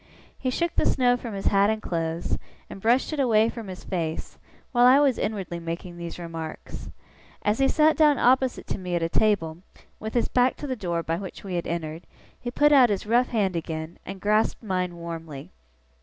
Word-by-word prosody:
He 260 - -1
shook 340 +6 -1
the - - +1
snow 245 -2 +3
from 235 -4 -6
his 195 - -5
hat 200 +1 +4
and 220 0 0
clothes, 165 -3 -2 0.3
and 195 - -9
brushed 245 +8 +2
it 305 - -3
away 225 -4 +4
from 230 -3 -7
his 185 -1 -8
face, 165 -3 -4 0.3
while 245 -1 +5
I 260 +2 +7
was 275 -4 +3
inwardly 195 -5 -3
making 170 +2 -6
these 170 -1 -7
remarks. 165 -2 -7 0.5
As 210 +3 +1
he 270 - +4
sat 310 +2 +4
down 300 -3 +5
opposite 260 +1 +2
to - - -2
me 180 -1 -3
at 170 - 0
a 165 - 0
table, 170 -5 +1 0.4
with 220 +2 -6
his 240 - +2
back 250 0 +2
to - - -7
the 260 -2 -2
door 175 -6 -2
by 165 +1 -1
which 190 0 -8
we 195 -2 -6
had 175 -1 -2
entered, 165 -1 -4 0.3
he 240 - -4
put 295 +4 +3
out 260 -4 +7
his 205 -1 -1
rough 240 +4 +3
hand 200 -6 0
again, 160 0 -5
and 195 - -7
grasped 215 +4 +1
mine 185 -4 -2
warmly. 165 -4 -7
200 Hz, 205 wpm, -25 LUFS, 170-245 Hz, 0.5 s, I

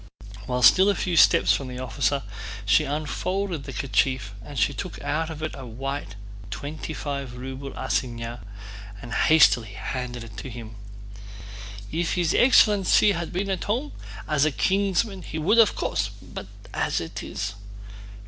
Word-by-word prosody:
While 125 0 -1
still 190 +9 +7
a 200 - +2
few 180 -1 -1
steps - - +6
from 135 - -2
the 125 0 -7
officer 130 +3 -1 0.4
she 100 +1 +4
unfolded 160 +3 -2
the - - -6
kerchief 130 -5 0
and 145 +4 -9
took 145 +7 -1
out 155 +3 -1
of 155 -1 -7
it 155 - -2
a 135 -3 -8
white 135 -1 -5 0.3
twenty 145 +9 -6
five 140 -5 -4
ruble 135 +2 -6
assignat 120 -1 -2 0.6
and 120 0 -8
hastily 120 -9 +4
handed 125 +3 -5
it 110 -2 -12
to 135 - -6
him. 115 -2 -8 1.2
"If 165 +1 -1
his 175 -2 +1
excellency 210 -5 +5
had 170 -3 -3
been 195 +2 -2
at 190 - -2
home, 250 +8 -1 0.4
as 150 -2 +2
a 155 - +3
kinsman 195 - +1
he 160 - -6
would 200 +9 +3
of 220 -4 +5
course... - - -1
but - - -9 0.3
as - - 0
it - - -6
is..." 100 0 -4
145 Hz, 155 wpm, -25 LUFS, 125-180 Hz, 1.2 s, still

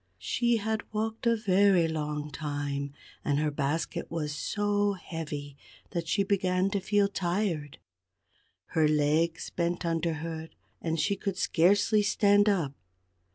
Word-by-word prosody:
She 240 -1 +1
had 220 0 -1
walked 220 +2 -2
a 230 - +4
very 195 -4 +4
long 150 -1 -3
time, 145 -1 -3 0.3
and 145 -1 +1
her 150 0 +1
basket 145 +2 -2
was 155 -3 -2
so 205 +3 0
heavy 155 -6 -6 0.4
that 170 -3 -3
she 200 +4 +2
began 190 -1 +1
to 200 - 0
feel 200 +1 +2
tired. 175 -6 -2 0.9
Her 160 -2 +3
legs 155 +2 +1
bent 175 0 -1
under 165 0 0
her 160 0 -5 0.3
and 165 -1 -1
she 175 +7 +1
could 195 -1 -3
scarcely 205 +5 +3
stand 205 0 +4
up. 165 -9 0
170 Hz, 135 wpm, -29 LUFS, 155-205 Hz, 0.9 s, a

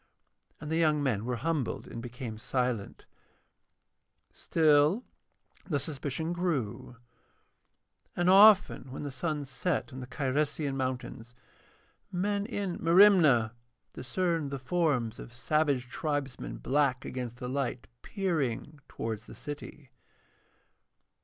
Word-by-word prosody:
And 150 +1 -7
the 160 - +1
young 155 -3 +3
men 115 -6 0
were 125 0 -1
humbled 155 0 -2
and 115 - -7
became 120 -2 -7
silent. 125 -3 -2 1.3
Still, 155 +7 +3 0.7
the 150 - +1
suspicion 150 +3 -3
grew. 145 - -2 1.2
And 175 0 +1
often 195 -8 +6
when 135 - -6
the 145 - -4
sun 145 +2 -2
set 135 +2 -2
on 130 - -7
the 125 - -7
Cyresian 140 +2 -1
mountains, 125 -2 -4 0.8
men 200 +3 -1
in 200 -6 -3
Merimna 165 - +6 0.4
discerned 165 +2 -1
the 140 - -4
forms 130 -5 0
of - - -9
savage 130 +2 0
tribesmen 135 - -3
black 135 - +1
against 125 -2 -5
the 125 - -5
light, 130 -2 -2 0.2
peering 155 - -2
towards 110 0 -5
the - - -11
city. 145 -1 -8
140 Hz, 115 wpm, -30 LUFS, 125-165 Hz, 1.3 s, often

